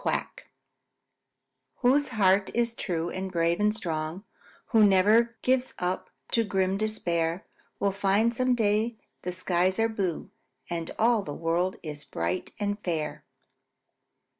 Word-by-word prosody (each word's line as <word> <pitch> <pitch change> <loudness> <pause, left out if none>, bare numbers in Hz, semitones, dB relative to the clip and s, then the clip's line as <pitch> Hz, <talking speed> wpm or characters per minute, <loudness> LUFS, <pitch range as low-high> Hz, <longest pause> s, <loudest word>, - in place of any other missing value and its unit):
QUACK - - -2 1.3
Whose 275 +3 +4
heart 200 -4 +3
is 235 -1 +1
true 170 -6 -2
and 190 0 -4
brave 170 -1 +1
and 210 0 +3
strong, 165 -3 -3 0.5
Who 225 -3 +5
ne'er 210 +4 +4
gives 255 0 +1
up 180 +1 -2 0.2
to 230 - +3
grim 190 -2 0
despair, 170 -5 -1 0.3
Will 200 - +2
find 200 +4 +2
some 255 +1 +2
day 220 +1 +1 0.3
that 180 - -4
skies 185 0 +1
are 225 0 +2
blue 190 -7 -3 0.4
And 165 -1 -3
all 230 -1 +3
the 150 -7 -6
world 170 +3 0
is 150 -2 -6
bright 85 -11 -3
and 205 0 -1
fair. 160 -4 -3
195 Hz, 135 wpm, -27 LUFS, 175-225 Hz, 1.3 s, Who